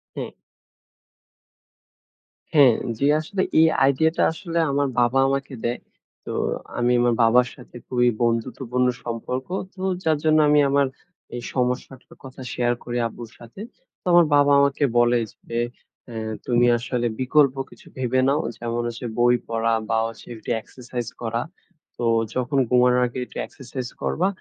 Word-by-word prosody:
হুম। - - -4 2.2
হ্যাঁ, 135 -6 +6 0.2
জি 140 - 0
আসলে 185 +5 -3 0.2
এই 160 - +7 0.2
আইডিয়াটা 160 +4 +2
আসলে 170 +1 -3
আমার 140 0 +1
বাবা 120 +2 +3
আমাকে 135 0 -2
দেয়। 120 +1 -1 0.5
তো - - -5 0.5
আমি 120 0 +2
আমার 120 0 +3
বাবার 120 +2 +5
সাথে 125 -3 -16
খুবই 125 -1 +2
বন্ধুত্বপূর্ণ 125 +2 0 0.2
সম্পর্ক। 120 +2 -4 0.3
তো 185 - -11 0.2
যার 160 -3 +2
জন্য 155 0 +4
আমি 150 - +5
আমার 140 0 +3 0.5
এই 120 - -4
সমস্যাটার 125 +1 -3
কথা 130 0 -10
শেয়ার 120 0 +1
করি 120 0 -4
আব্বুর 115 0 -10
সাথে। 120 - -12 0.4
তো - - -64
আমার 175 -1 +7
বাবা 145 0 +4
আমাকে 140 +1 +2
বলে 120 0 +4 0.3
যে, 115 - -1 0.5
এ - - -8 0.3
তুমি 120 -1 +3
আসলে 120 0 -2
বিকল্প 140 +1 +3
কিছু - - -17
ভেবে 130 0 0
নাও, 145 +3 +2 0.2
যেমন 120 0 -2
হচ্ছে 120 +1 -6
বই 120 0 +5
পড়া 115 0 0 0.2
বা 115 - +2
হচ্ছে 115 0 -11
একটু 110 - -10
এক্সারসাইজ 125 0 -7
করা। 115 0 -1 0.6
তো - - -4 0.3
যখন 130 +3 -1
ঘুমানোর 125 0 +4
আগে 120 - -6
একটু - - -12
এক্সারসাইজ 130 -1 -7
করবা, 185 +4 0
125 Hz, 150 wpm, -23 LUFS, 120-140 Hz, 2.2 s, এই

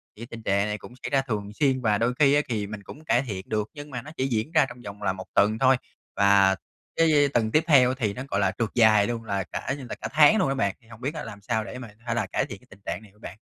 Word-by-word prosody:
Thì 110 - -14
cái 120 - -7
tình 115 -1 -8
trạng 100 0 +1
này 105 0 -2
cũng 120 - -12
xảy - - -3
ra 135 -1 +2
thường 105 -6 -4
xuyên 130 +1 +1
và 105 -4 +2
đôi 115 +3 +1
khi 140 -2 +5
á, 145 - +4
kì 105 -4 -2
mình 105 -1 -8
cũng 150 +9 -11
cải 120 - +3
thiện 100 -8 -6
được, 105 -1 -1
nhưng 145 -1 -9
mà 125 -3 -5
nó 150 +6 -11
chỉ 130 - 0
diễn 115 +3 -1
ra 150 - +4
trong 120 0 -11
vòng 105 -2 -9
là 100 - 0
1 95 0 -8
tuần 110 +2 +3
thôi. 130 +1 +5 0.4
Và 100 -1 +5 0.4
cái 150 -3 +4
tuần 110 -2 +1
tiếp 155 +6 +3
theo 130 -5 +6
thì 110 -6 -1
nó, 125 - -6
gọi 100 - +1
là, 100 -2 +2
trượt 115 -3 0
dài 110 -3 +5
luôn, 115 -1 -3
là 100 -3 -2
cả 135 - -4
như 135 - -8
là - - -4
cả 110 - -2
tháng 155 +7 +6
luôn 185 -10 +2
á 135 - 0
bạn, 100 -7 0
thì 115 - -24
hông 115 0 -14
biết 140 +5 -2
á 150 - -5
làm 105 -2 -9
sao 110 +1 -1
để 125 - -8
mà 120 -3 -8 0.2
hay 120 -1 -1
là 115 - 0
cải - - -1
thiện - - -9
cái - - -24
tình - - -15
trạng 85 +4 -3
này 105 - -16
hở 105 - -27
bạn? 100 -2 -10
115 Hz, 315 wpm, -26 LUFS, 105-135 Hz, 0.4 s, theo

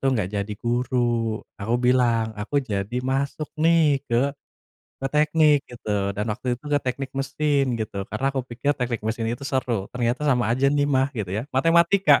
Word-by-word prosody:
tuh 135 - +1
enggak 100 -1 -2
jadi 100 0 -2
guru, 120 -2 0 0.2
aku 110 +4 -1
bilang 120 -3 +2
aku 130 +7 -3
jadi 105 +1 -3
masuk 140 +3 -1
nih 160 -4 +4
ke 125 +4 +2 0.7
ke 135 - -1
teknik", 150 0 +4
gitu. 105 -4 -2
Dan 105 +1 -2
waktu 125 +4 -9
itu - - -30
ke 145 -1 +3
teknik 130 +1 -3
mesin 140 +1 +1 0.2
gitu. 105 -2 -4
Karena 110 +6 -2
aku 135 -1 -1
pikir 140 +4 -1
teknik 125 -3 -2
mesin 115 0 -1
itu 130 +4 -7
seru. 120 -7 -1
Ternyata 120 +1 -1
sama 125 -3 +3
aja 130 +3 +3
nih 145 0 +2
mah 135 -1 +2
gitu 100 -5 -3
ya, 110 +8 -3
matematika 170 +7 +4
125 Hz, 175 wpm, -24 LUFS, 115-140 Hz, 0.7 s, nih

